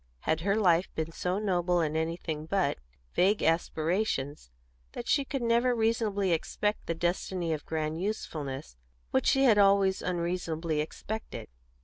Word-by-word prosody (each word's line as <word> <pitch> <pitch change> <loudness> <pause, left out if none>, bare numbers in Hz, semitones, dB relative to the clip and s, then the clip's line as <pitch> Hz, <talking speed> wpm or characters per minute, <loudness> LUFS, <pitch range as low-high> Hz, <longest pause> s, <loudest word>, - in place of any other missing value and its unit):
Had 160 0 0
her 200 +3 +1
life 180 -4 +3
been 160 +1 -2
so 180 +3 -2
noble 180 -4 +1
in 155 -2 0
anything 160 -1 -2
but 190 - +1 0.3
vague 200 +3 +3
aspirations 165 - 0 0.4
that - - -6
she 280 - +3
could 270 -2 -3
ever 235 +2 +3
reasonably 220 -4 +1
expect 210 +5 -1
the 165 - -1
destiny 175 0 -1
of 150 - -6
grand 160 +1 -2
usefulness 145 - -4 0.3
which 130 - +2
she 270 - +4
had 225 -6 +6
always 195 -1 +4
unreasonably 170 -3 -1
expected? 215 +8 -6
175 Hz, 140 wpm, -29 LUFS, 160-205 Hz, 0.4 s, had